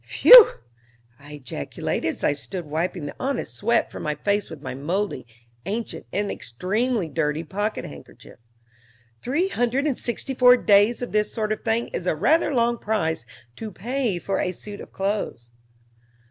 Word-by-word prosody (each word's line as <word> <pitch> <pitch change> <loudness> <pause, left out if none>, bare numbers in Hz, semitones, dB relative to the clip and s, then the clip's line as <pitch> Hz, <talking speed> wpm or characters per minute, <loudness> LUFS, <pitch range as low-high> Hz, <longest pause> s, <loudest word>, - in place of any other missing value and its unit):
"Phew!" - - +9 0.7
I 145 +1 -12
ejaculated, 125 - -4
as - - -4
I - - +3
stood 175 +4 -6
wiping 160 +2 -3
the 145 - -7
honest 275 +2 -2
sweat 235 +3 0
from - - -8
my 150 0 -2
face 200 +6 -1
with 160 -3 -9
my 140 - -6
moldy, 150 - -3 0.4
ancient, 220 +3 -4
and 205 +1 -1
extremely 205 - -2
dirty 155 0 -1
pocket 205 +6 -3
handkerchief. 70 -1 -13 0.8
"Three 320 +10 0
hundred 245 -1 0
and 280 -5 -1
sixty 250 +3 -2
four 250 -1 +6
days 210 +3 +3
of 245 - -5
this 210 0 +1
sort 215 -2 -2
of 215 - -1
thing 225 +1 -1
is 180 - -5
a 160 - +1
rather 315 - +2
long 235 -2 +1
price 160 - -2 0.3
to 220 -1 -6
pay 235 +1 -2
for 195 +2 -2
a 180 - -1
suit 205 +3 -9
of - - -12
clothes." 195 - -3
205 Hz, 165 wpm, -23 LUFS, 160-235 Hz, 0.8 s, Phew